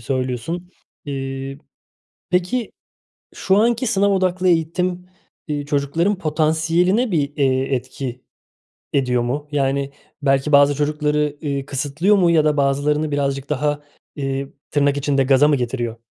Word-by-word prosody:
söylüyorsun, 130 +8 -3 0.4
ııı. 135 0 -5 0.7
Peki, 185 +6 0 0.6
şu 190 +1 +1
anki 235 +4 +2
sınav 200 -3 +2
odaklı 185 -1 +1
eğitim, 180 +2 0 0.4
ııı, 145 -1 -2
çocukların 150 +7 0
potansiyeline 165 +8 +1
bir, 145 -4 -1
eee, 135 -1 +1
etki 125 0 -5 0.7
ediyor 125 -3 +1
mu? 140 +5 -3
Yani, 140 0 0 0.3
belki 135 +1 +1
bazı 140 0 +6
çocukları, 150 0 0
iii, 140 -3 -3
kısıtlıyor 150 +9 +1
mu 175 -3 +4
ya 160 -2 +4
da 150 -1 +2
bazılarını 145 +2 +1
birazcık 140 -1 -1
daha, 150 +1 0 0.4
ııı, 135 0 -2 0.2
tırnak 145 -1 +2
içinde 140 -1 +1
"gaza" 135 +2 +5
mı 145 - +3
getiriyor? 120 -2 -3
145 Hz, 125 wpm, -20 LUFS, 135-170 Hz, 0.7 s, bazı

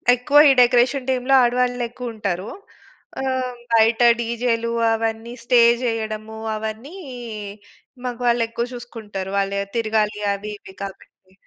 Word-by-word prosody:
ఎక్కువ 280 +4 +4
ఈ - - +7
డెకరేషన్ 250 +2 +3
టీమ్‌లో 255 +1 +1
ఆడవాళ్ళు 245 0 +1
ఎక్కువ 245 -1 -7
ఉంటారు. 200 -1 -3 0.7
ఆహ్, 260 -1 -2 0.2
బయట 225 +1 +4 0.2
డీజేలు, 235 0 -1 0.2
అవన్నీ 225 +1 -3
స్టే 245 -1 +5 0.2
చేయడము, 220 -2 -3 0.2
అవన్నీ 220 - -6 1.1
మాగవాళ్ళు 240 -1 +1
ఎక్కువ 235 +1 -3
చూసుకుంటారు 220 -6 -7
వాళ్ళు 195 0 0
ఎ - - -1
తిరగాలి 215 -2 0
అవి 210 +1 -6
ఇవి 190 - -14
కాబట్టి. 190 -1 -11
230 Hz, 120 wpm, -21 LUFS, 215-245 Hz, 1.1 s, ఈ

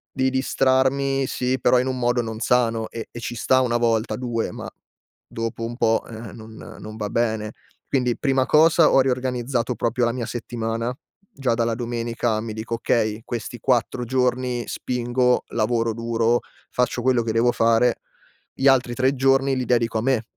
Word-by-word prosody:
Di 130 0 +2
distrarmi, 135 +1 +1
sì, 125 +1 -1
però 125 0 +4
in 125 - 0
un 130 -1 -2
modo 120 0 +1
non 110 -1 -4
sano 115 -2 +1
e 115 - -7
e - - -9
ci 120 0 -5
sta 130 +2 +2
1 120 -1 +1
volta, 115 -1 +1
2, 120 -2 -2
ma, - - -7 0.6
dopo 115 0 -4
un 120 - -4
po', 115 0 +2
ehm, 110 -2 -9
non 110 0 -11 0.3
non 110 0 -8
va 105 -2 -3
bene. 110 -1 -1 0.4
Quindi, 125 -3 0
prima 135 -2 +2
cosa, 160 +1 +5
ho 135 - +6
riorganizzato 125 -1 -1
proprio 120 +2 0
la 120 - +1
mia 120 -2 -4
settimana. 115 0 -3 0.4
Già 130 -4 0
dalla 115 0 0
domenica 115 -1 -2
mi 115 - -5
dico: 110 +2 -4
"Okay, 110 -1 0
questi 120 0 -5
4 125 +1 0
giorni 125 -1 0
spingo, 125 0 0
lavoro 115 0 0
duro, 115 +1 +1 0.3
faccio 125 0 0
quello 125 -1 +2
che 110 -1 -2
devo 115 +2 +3
fare, 115 +1 +3 0.6
gli 135 - -4
altri 125 -3 +3
3 130 +1 +2
giorni 135 0 +2
li 130 -1 -2
dedico 115 -2 +1
a - - -1
me. 125 -2 +1
120 Hz, 175 wpm, -23 LUFS, 115-130 Hz, 0.6 s, ho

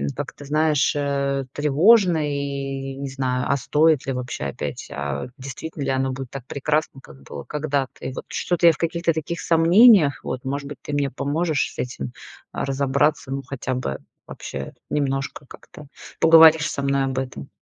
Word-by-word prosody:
как-то, 145 - -7
знаешь, 150 0 +2
э, 140 -1 -1
тревожно 170 +6 +4
и 140 -2 -3
не 140 -1 -5
знаю, 130 -2 -2
а 140 - +2
стоит 150 +2 +2
ли 135 - 0
вообще 125 - -4
опять, 70 +1 -5
а, 70 - -4
действительно 140 +3 -7
ли - - -2
оно 130 0 0
будет 130 -1 -6
так 135 -3 -8
прекрасно, 150 0 -1
как 70 - -16
было 70 0 -8
когда-то. 145 -4 -3
И 130 - -4
вот - - -7
что-то 175 -1 +1
я 165 - +7
в - - -11
каких-то 170 0 0
таких 160 +2 -4
сомнениях, 170 - +5
вот, 130 +1 -5
может 140 +1 -3
быть, 145 -2 -8
ты 145 - -6
мне 140 -1 0
поможешь 150 +3 -1
с - - -14
этим, 70 - -4 0.4
а, - - -3
разобраться, 140 +1 0
ну 135 0 -2
хотя 130 0 -4
бы 95 - -3 0.3
вообще - - -7 0.2
немножко 135 -1 -2
как-то 150 +2 -14 0.3
поговоришь 160 -1 +7
со 140 - -3
мной 140 0 +1
об 130 -1 -3
этом. 130 - -6
140 Hz, 175 wpm, -22 LUFS, 130-155 Hz, 0.4 s, я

